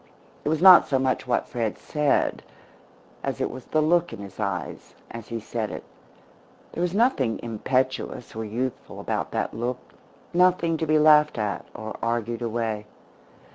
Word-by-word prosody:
It -, -, -1 dB
was 160 Hz, +2 st, 0 dB
not 185 Hz, -2 st, +9 dB
so 135 Hz, -, +2 dB
much 130 Hz, 0 st, 0 dB
what 120 Hz, -, 0 dB
Fred 115 Hz, -3 st, -2 dB
said 150 Hz, -2 st, 0 dB, 0.8 s
as -, -, -3 dB
it -, -, -1 dB
was 130 Hz, -1 st, -9 dB
the 155 Hz, 0 st, +1 dB
look 170 Hz, +2 st, +2 dB
in -, -, -7 dB
his 100 Hz, +1 st, -10 dB
eyes 100 Hz, -4 st, -4 dB, 0.2 s
as 115 Hz, -2 st, -8 dB
he 115 Hz, -, -4 dB
said 110 Hz, 0 st, -4 dB
it. -, -, -7 dB, 0.9 s
There -, -, -4 dB
was 180 Hz, +1 st, 0 dB
nothing 200 Hz, -, +2 dB
impetuous 125 Hz, +2 st, -2 dB
or 110 Hz, -, -3 dB
youthful 120 Hz, +4 st, -4 dB
about -, -, -2 dB
that -, -, -1 dB
look, 120 Hz, +2 st, -2 dB, 0.6 s
nothing 175 Hz, -2 st, +3 dB
to 160 Hz, -, -2 dB
be 155 Hz, 0 st, +4 dB
laughed 150 Hz, -1 st, +5 dB
at 105 Hz, -2 st, -2 dB
or 110 Hz, 0 st, -6 dB
argued 115 Hz, 0 st, -2 dB
away. 110 Hz, -2 st, -2 dB
125 Hz, 165 wpm, -25 LUFS, 115-155 Hz, 0.9 s, not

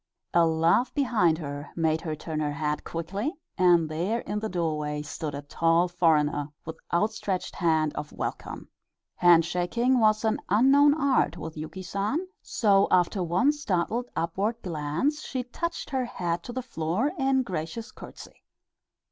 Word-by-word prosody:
A 170 Hz, -1 st, +5 dB
laugh 165 Hz, +10 st, +2 dB
behind 225 Hz, -, +2 dB
her 145 Hz, -2 st, -6 dB
made 160 Hz, -1 st, +1 dB
her 155 Hz, -2 st, -3 dB
turn 155 Hz, 0 st, -5 dB
her 150 Hz, -1 st, -1 dB
head 150 Hz, +1 st, -2 dB
quickly, 195 Hz, -, -3 dB, 0.2 s
and 175 Hz, -3 st, +4 dB
there 180 Hz, +10 st, -1 dB
in 210 Hz, +1 st, -3 dB
the 220 Hz, +1 st, -3 dB
doorway 150 Hz, -4 st, -2 dB
stood 150 Hz, 0 st, -5 dB
a 140 Hz, -, -6 dB
tall 165 Hz, +4 st, +2 dB
foreigner, 150 Hz, -4 st, +2 dB, 0.2 s
with 160 Hz, 0 st, -7 dB
outstretched 195 Hz, 0 st, -1 dB
hand 160 Hz, -3 st, +2 dB
of 150 Hz, -, -6 dB
welcome. -, -, -5 dB, 0.5 s
Hand 170 Hz, -2 st, +6 dB
shaking 235 Hz, +10 st, +1 dB
was 215 Hz, 0 st, +3 dB
an 220 Hz, -, +1 dB
unknown 275 Hz, +8 st, +5 dB
art 275 Hz, -, +1 dB
with 160 Hz, -1 st, -7 dB
Yuki 160 Hz, +4 st, -7 dB
San, 205 Hz, -, -2 dB, 0.2 s
so 200 Hz, -3 st, +3 dB
after 180 Hz, +2 st, +2 dB
one 180 Hz, -, +3 dB
startled 240 Hz, -, -2 dB
upward 195 Hz, +7 st, -1 dB
glance 170 Hz, -, -1 dB
she 260 Hz, -4 st, -4 dB
touched 335 Hz, +8 st, -5 dB
her 260 Hz, -2 st, 0 dB
head 175 Hz, -6 st, -3 dB
to 240 Hz, -, -8 dB
the 255 Hz, +1 st, -4 dB
floor 200 Hz, -, -1 dB
in 265 Hz, -1 st, +2 dB
gracious 185 Hz, +3 st, -5 dB
courtesy. -, -, -12 dB
175 Hz, 155 wpm, -27 LUFS, 160-235 Hz, 0.5 s, Hand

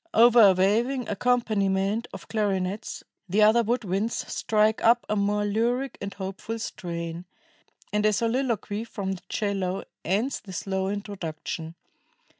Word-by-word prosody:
Over 235 Hz, +1 st, +7 dB
a 200 Hz, -3 st, +8 dB
waving 230 Hz, +7 st, +1 dB
accompaniment 210 Hz, -2 st, +1 dB
of -, -, -10 dB
clarinets, 200 Hz, -1 st, -2 dB, 0.3 s
the 210 Hz, +4 st, +4 dB
other 220 Hz, +3 st, +6 dB
wood 240 Hz, +2 st, 0 dB
winds 200 Hz, +4 st, -1 dB, 0.2 s
strike 215 Hz, 0 st, +2 dB
up 235 Hz, +1 st, +5 dB
a 210 Hz, -, 0 dB
more 205 Hz, 0 st, +1 dB
lyric 240 Hz, +5 st, 0 dB
and 200 Hz, 0 st, -4 dB
hopeful 195 Hz, +4 st, -5 dB
strain, 170 Hz, -5 st, -5 dB, 0.7 s
and 210 Hz, 0 st, +2 dB
a -, -, +4 dB
soliloquy 225 Hz, -1 st, -1 dB
from 200 Hz, -4 st, -4 dB
the 190 Hz, -, -5 dB
'cello 195 Hz, -3 st, -1 dB, 0.2 s
ends 210 Hz, -, 0 dB
the 190 Hz, -3 st, -11 dB
slow 190 Hz, +1 st, -2 dB
introduction. 170 Hz, -5 st, -5 dB
205 Hz, 135 wpm, -26 LUFS, 190-230 Hz, 0.7 s, a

